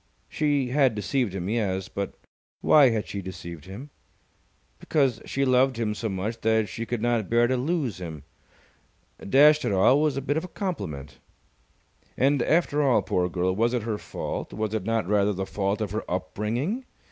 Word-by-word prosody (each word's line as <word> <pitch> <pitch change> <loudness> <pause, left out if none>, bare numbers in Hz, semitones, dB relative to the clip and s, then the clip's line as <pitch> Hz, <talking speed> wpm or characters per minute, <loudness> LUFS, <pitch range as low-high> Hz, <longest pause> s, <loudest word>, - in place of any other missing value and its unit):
She 145 -4 0
had 130 -3 +3
deceived 105 0 -1
him, 90 -1 -3
yes. 100 -4 -1
But 100 0 -5 0.5
why 145 -4 +6
had 110 -3 -2
she 100 - -5
deceived 85 -4 -8
him? 120 +10 -9 0.9
Because 135 -7 +1
she 140 0 -1
loved 130 0 +3
him 110 -2 -1
so 105 +2 -3
much 105 +4 -4
that 110 -1 +2
she 115 +3 -5
could 120 -2 -3
not 120 -4 0
bear 120 +1 +4
to 130 +2 +1
lose 130 - -1
him. 80 -5 -7 1.0
Dash 150 +7 +5
it - - 0
all, 100 +8 +4
it - - +1
was 150 -3 +1
a - - -1
bit 145 +2 0
of 160 - -1
a - - -6
compliment. 85 - -5 1.0
And, 140 +1 +3
after 150 0 +2
all, 135 -4 +3
poor 90 0 0
girl, 90 +1 0
was 115 +4 +1
it 120 - -1
her 110 -2 -3
fault? - - -5
Was 110 0 -3
it 110 -4 -2
not 115 -5 0
rather 105 0 +2
the 95 0 -3
fault 100 +2 -2
of 105 -3 -2
her 110 - -2
upbringing? 110 - -2
115 Hz, 185 wpm, -26 LUFS, 100-135 Hz, 1.0 s, why